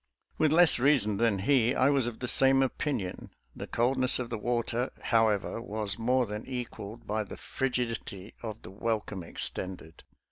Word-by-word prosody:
With 155 -2 +3
less 160 -5 +6
reason 125 -7 +3
than 115 -3 +2
he, 125 +3 +2
I 130 +2 +3
was 135 -4 +2
of 120 0 -6
the 125 - -2
same 135 +1 +6
opinion. 130 -8 -3 0.3
The - - -7
coldness 130 +2 +2
of 120 -2 -5
the 115 - -2
water, 120 +2 -1
however, 110 -1 +1
was 105 -2 -4
more 125 +2 +2
than 105 0 -6
equaled 120 -3 -7
by 110 +1 -1
the 100 - -10
frigidity 115 -6 -4
of 110 -2 -7
the 90 - -10
welcome 105 -2 -3
extended. 85 0 -6
115 Hz, 165 wpm, -29 LUFS, 105-130 Hz, 0.3 s, less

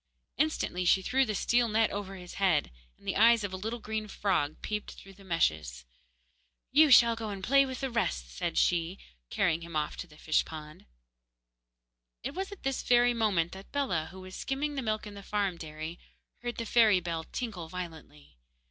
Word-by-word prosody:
Instantly 305 - 0
she 190 +2 +4
threw 265 +6 +2
the 215 - -1
steel 235 +4 +2
net 220 +1 +2
over 195 -1 -5
his 180 -2 -10
head, 170 - +3 0.3
and - - -19
the - - 0
eyes 230 +1 +6
of 200 -2 -3
a - - -1
little 220 +5 -4
green 220 -1 -4
frog 185 -8 0
peeped 210 -1 -3
through 195 - -13
the 195 +1 -17
meshes. 75 - 0 0.9
'You 305 +2 +6
shall 235 -3 +7
go 225 -1 -5
and 195 -2 -6
play 275 +5 +5
with 260 +1 -6
the 265 -1 -2
rest,' 120 - -1 0.2
she 175 +1 +2
said, - - -23
carrying 160 +1 +1
him 170 -1 -8
off 150 -1 -1
to 180 - -6
the 150 -2 -17
fish 155 0 +2
pond. 155 - -10 1.4
It 275 +4 -4
was 385 +3 -4
at 405 - -10
this 270 -1 -1
very 245 0 +4
moment 200 -8 +1
that 190 +1 -11
Bellah, 185 - 0
who 190 +2 -11
was 185 0 -9
skimming 285 +2 -2
the 275 - -2
milk 215 -3 -2
in 210 - -8
the 200 - -9
farm 200 -3 -1
dairy, 155 +1 -7 0.4
heard 240 0 -4
the 230 - -3
fairy 220 -4 +5
bell 165 -2 -3
tinkle 200 -10 -5
violently. 160 - -9
195 Hz, 195 wpm, -30 LUFS, 165-235 Hz, 1.4 s, shall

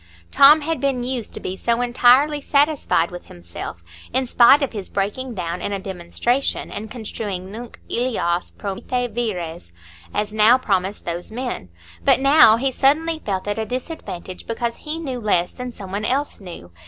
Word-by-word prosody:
Tom 295 +3 +7
had 320 -2 -2
been 270 -3 0
used 245 -3 -3
to - - -5
be 185 - -5
so 235 +4 0
entirely 250 +4 +4
satisfied 280 - +2
with 175 0 -9
himself, 85 0 -9 0.3
in 260 +2 0
spite 245 +4 +6
of 275 - -2
his 205 -3 -6
breaking 220 +5 -3
down 175 -1 -4
in - - -3
a 200 - -1
demonstration, 190 +8 -2
and 215 +2 -6
construing 205 -5 -5
nunc 235 +3 -9
illas 215 -8 -1
promite 235 +4 -3
vires 175 - -4 0.4
as 210 0 -2
"now 220 +3 +6
promise 195 -4 -1
those 175 +3 -5
men"; 245 - -4 0.3
but - - +4
now 275 -5 +7
he 265 +3 0
suddenly 315 +5 +2
felt 195 -1 -3
at 205 +2 -1
a 220 - -1
disadvantage, 245 - -6
because 230 0 -2
he 305 +1 -5
knew 270 -7 -4
less 180 -6 +1
than 250 -1 -7
some 195 -5 -10
one 200 +2 -3
else 275 +6 -1
knew. 170 - -10
230 Hz, 170 wpm, -21 LUFS, 190-260 Hz, 0.4 s, Tom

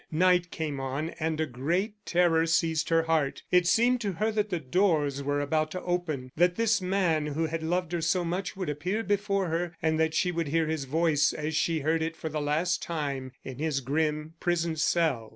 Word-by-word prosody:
Night 180 +1 +3
came 150 -5 -4
on 135 +5 -3
and 160 -1 -1
a 160 - +2
great 165 - -1
terror 170 -2 +3
seized 160 -1 +1
her 165 0 +3
heart. 160 -4 0
It 180 -1 +4
seemed 240 +5 +3
to 200 -3 -1
her 215 +5 0
that 210 -1 -1
the 175 - -1
doors 150 -2 +1
were 145 +1 -1
about 155 +2 0
to 185 - -4
open, 160 -8 -2
that 175 +2 +3
this 225 -1 +2
man 180 -5 +1
who 155 +2 -1
had 160 +1 -3
loved 175 +1 -1
her 175 -1 -1
so 175 +2 +1
much 180 +2 -3
would 185 - -3
appear 180 +10 -2
before 200 -2 0
her, 170 +1 -2
and 160 0 +1
that 160 0 +1
she 180 +2 +2
would 165 -2 -2
hear 165 +3 +1
his 155 -3 -2
voice 150 +1 +2
as 155 +1 -3
she 160 0 +1
heard 160 +3 +1
it 165 +1 -2
for 160 - -5
the 150 0 -3
last 160 +5 0
time 140 -5 -3
in 130 0 -8
his 155 -2 0
grim 150 +3 -1
prison 170 -2 0
cell. 155 -7 +1
165 Hz, 210 wpm, -28 LUFS, 150-180 Hz, -, It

